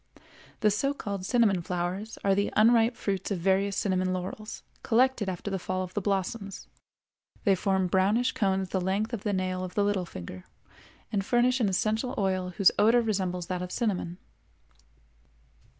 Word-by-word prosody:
The 210 -2 +4
so 275 +8 0
called 200 -6 -4
cinnamon 220 -7 +3
flowers 180 +5 -3
are 195 - +3
the 200 +1 0
unripe 230 +2 +5
fruits 195 -3 -2
of 200 - -1
various 195 +3 +1
cinnamon 185 -2 0
laurels, 185 +4 -6 0.2
collected 240 -3 +2
after 190 +2 -4
the 195 - -1
fall 185 +1 -2
of 185 0 -8
the 205 - -1
blossoms. 195 +1 -3 0.8
They 200 - +4
form 190 0 +1
brownish 195 +7 +2
cones 190 -3 0
the 190 - -1
length 200 +5 -1
of 225 - -3
the 210 - -1
nail 185 -1 -1
of 185 - -7
the 205 - +3
little 200 -3 0
finger, 90 - -9 0.7
and 200 -2 0
furnish 245 +4 +2
an 220 -5 +2
essential 220 +6 0
oil 185 -2 0
whose 195 - +6
odor 230 +3 +5
resembles 185 -5 -1
that 180 0 -3
of 180 0 -5
cinnamon. 185 -7 -2
195 Hz, 165 wpm, -28 LUFS, 185-215 Hz, 0.8 s, whose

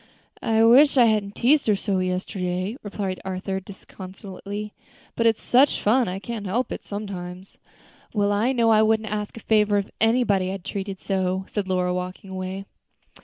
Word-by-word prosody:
"I 225 -1 +3
wish 270 +5 +6
I 245 - +7
hadn't 210 -2 +1
teased 280 +3 +3
her 210 - +4
so 195 -1 -1
yesterday," 185 +2 -2
replied 200 -2 -4
Arthur, 190 +1 -3
disconsolately, 195 +2 -8 0.4
"but 230 - +2
it's 225 -1 +1
such 265 +4 +4
fun, 240 +4 +3
I 180 +1 -3
can't 210 0 -5
help 235 +7 -1
it - - -5
sometimes." 190 -2 -7 0.5
"Well, 205 -2 +1
I 215 +5 +2
know 235 -3 +3
I 215 -1 +5
wouldn't 220 -1 +1
ask 210 +1 -4
a - - -8
favor 210 -1 +3
of 200 - -2
anybody 225 -5 +3
I - - -3
had 195 -3 -8
treated 195 -1 -4
so," 190 -1 -1
said 205 -3 -3
Lora, 180 -1 0
walking 180 +1 -5
away. 190 +1 -5
200 Hz, 170 wpm, -24 LUFS, 190-220 Hz, 0.5 s, I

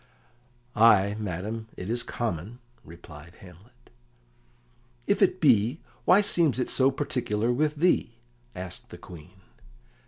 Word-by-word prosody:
"Ay, 105 -3 +5
madam, 105 +3 -5
it 90 - -6
is 120 +2 -1
common," 110 -1 -4 0.3
replied 80 0 -14
Hamlet. 100 +7 -18 1.1
"If 200 - 0
it 185 -1 +3
be, 125 - +3 0.3
why 185 +3 +6
seems 165 - +1
it 125 - -2
so 130 0 +3
particular 125 -5 -2
with 150 +4 0
thee?" 155 -7 +1 0.4
asked 90 -1 -7
the - - -10
Queen. 90 +2 -14
115 Hz, 120 wpm, -26 LUFS, 95-130 Hz, 1.1 s, why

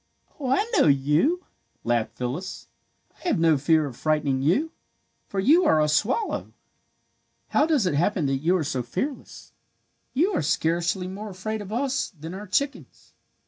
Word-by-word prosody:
"Oh, 265 -3 -3
I 275 +11 +2
know - - +5
you," 150 - +2 0.4
laughed 115 -1 -1
Phyllis. 135 +10 -5 0.5
"I - - -7
have - - +2
no 165 -1 +4
fear 155 +2 +3
of 135 -4 -7
frightening 150 -3 0
you, 240 - +1 0.6
for 195 - -3
you 305 - +5
are 160 - +4
a 150 - +3
swallow. 215 - 0 1.0
"How 295 - +3
does 295 -10 +2
it 180 - +1
happen 170 +2 +1
that 135 0 +1
you 170 +7 +2
are 165 - -1
so 135 -3 -2
fearless? 190 - -5 0.6
You 355 +8 +2
are - - +1
scarcely 170 +4 0
more 205 +3 -6
afraid 210 +3 -4
of 205 0 -8
us 270 +4 -1
than 160 +3 -7
our 205 +2 -7
chickens. 280 +9 -3
180 Hz, 165 wpm, -25 LUFS, -, 1.0 s, know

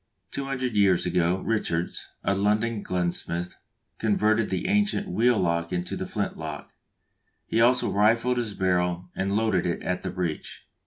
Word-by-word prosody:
Two 140 - -3
hundred 130 -4 -2
years 95 -4 +4
ago, 90 +1 +1
Richards, 90 -6 -1 0.2
a 100 - +2
London 105 +3 +1
gunsmith, 90 -1 -2 0.4
converted 110 0 +2
the 180 - -2
ancient 205 0 +1
wheel 120 - +3
lock 85 -2 0
into 90 -1 -2
the - - -4
flint - - -2
lock; - - -7 0.7
he 115 - +1
also 125 +2 +4
rifled 115 +4 +3
his 110 -4 -3
barrel 90 -1 0
and 100 +1 -1
loaded 105 -5 +1
it 85 - -2
at 90 0 -1
the 95 - -3
breech. 90 -3 -4
100 Hz, 155 wpm, -26 LUFS, 90-115 Hz, 0.7 s, years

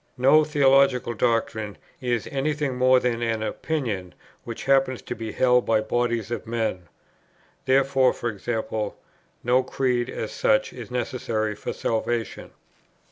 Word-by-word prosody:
No 140 +5 +5
theological 135 -5 +3
doctrine 110 -2 -1 0.2
is 120 -3 -1
any 140 +2 0
thing 140 -3 -2
more 130 0 +5
than 120 -2 -1
an 115 -2 -1
opinion 110 - -3 0.3
which 115 -1 -6
happens 135 -2 +3
to - - -4
be 110 -1 -6
held 125 +1 +3
by 110 -1 +3
bodies 120 0 -1
of 120 - -4
men. 110 -6 -2 0.8
Therefore, 135 -1 +3 0.2
e.g. 110 +3 -2 0.8
no 125 +2 +3
creed, 125 -2 -1
as - - -4
such, - - +1
is - - -9
necessary 120 -3 -2
for 105 - -5
salvation. 115 0 -2
125 Hz, 135 wpm, -24 LUFS, 115-135 Hz, 0.8 s, No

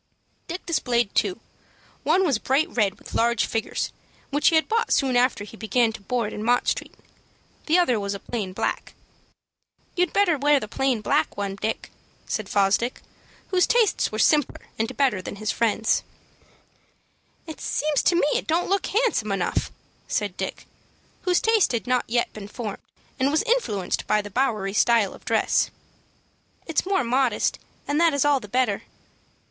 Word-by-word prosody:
Dick 350 +2 -6
displayed 240 - 0
two. 370 - 0 0.6
One 380 +1 +3
was 275 -10 +1
bright 270 +6 +2
red 205 -5 +1
with - - -13
large 235 -1 +2
figures, 225 0 -2 0.4
which 290 +2 +2
he 330 - +5
had 315 - +3
bought 455 +1 0
soon 265 -3 +2
after 245 -4 +2
he 210 - -11
began 225 +1 +1
to - - -9
board 230 +1 -2
in 210 - -5
Mott 245 +2 +2
Street. - - -2 0.7
The 325 +3 +4
other 255 -11 +3
was 200 0 -3
a - - -6
plain 205 -3 -4
black. 185 - -3 1.0
"You'd 360 -2 +1
better 355 -7 +2
wear 290 +1 +4
the 215 - -6 0.4
black - - +1
one, 200 -1 -3
Dick," 215 +3 -4 0.3
said 215 -3 -3
Fosdick, 205 +4 +1 0.5
whose 370 -2 +3
taste 465 -5 +2
was 215 0 +1
simpler 300 -3 +2
and 225 +3 -2
better 260 -9 +2
than 185 - -7
his 215 +1 -2
friend's. 225 -1 +1 1.4
"It 315 -2 -9
seems 300 -1 0
to 355 - +3
me 345 - +3
it - - -1
don't 335 +2 +1
look 395 -1 +1
handsome 415 - +1
enough," 190 -3 -1 0.4
said 205 -4 -2
Dick, - - -5 0.6
whose 360 -1 +3
taste 445 - +3
had 235 - -1
not 250 -1 +1
yet 240 +1 0
been 205 -2 -8
formed, 210 -1 -6 0.4
and 265 +2 +3
was 310 +2 +2
influenced 445 - -1
by 210 -1 +2
the 205 - -9
Bowery 215 -5 0
style 225 -2 +3
of - - -15
dress. - - +2 1.0
"It's 325 +2 -1
more 385 -6 +2
modest, 250 -2 +1 0.3
and 290 +2 +1
that 330 -3 +4
is 285 - +2
all 290 -2 +4
the 210 - -10
better." 245 -2 0
245 Hz, 170 wpm, -24 LUFS, 215-310 Hz, 1.4 s, he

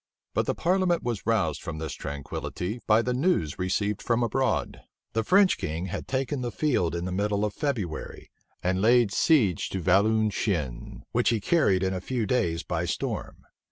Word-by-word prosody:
But - - 0
the - - 0
parliament 180 -1 +1
was 115 -4 -3
roused 85 -10 +1
from 85 -3 -5
this 80 0 -4
tranquillity 90 - -5
by 110 +1 +5
the 125 - 0
news 125 - 0
received 100 +3 -1
from 120 0 +1
abroad. 130 +3 0 0.3
The 115 +1 +1
French 195 - +4
king 80 +4 -3
had 95 - -5
taken 135 0 -1
the 120 - -2
field 100 - 0
in 85 +1 -3
the 95 - -3
middle 100 +2 0
of 105 - -3
February, 110 - -4 0.3
and 95 +1 +1
laid 115 -2 +4
siege 110 - +3
to 95 - -3
Valenciennes, 95 - +1
which - - +2
he 115 -1 +1
carried 100 - +2
in 95 0 0
a 90 - -3
few 120 +1 -2
days 90 -7 0
by 85 0 -2
storm. 85 - -4
105 Hz, 175 wpm, -27 LUFS, 90-125 Hz, 0.3 s, by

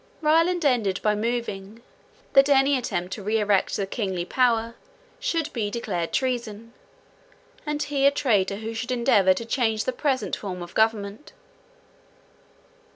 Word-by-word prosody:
Ryland 330 +2 +2
ended 225 -9 +1
by 210 - +3
moving, 220 -1 -4 0.5
that 275 +1 +6
any 275 0 +4
attempt 190 -8 -3
to 210 - -6
re 210 +3 0
erect 205 -2 +1
the 200 - -1
kingly 190 -4 -3
power 230 +1 +1 0.5
should 335 -11 -2
be 215 -4 -2
declared 195 -7 -3
treason, 235 -3 -3 0.9
and 300 0 -1
he 280 -1 +2
a - - +5
traitor 210 -9 +1
who 220 +2 -6
should 235 +3 -5
endeavour 200 -6 +3
to 230 - -5
change 225 -3 0
the 255 - -2
present 265 0 -1
form 180 -3 -6
of 175 - -11
government. 220 +2 -1
230 Hz, 145 wpm, -24 LUFS, 200-265 Hz, 0.9 s, that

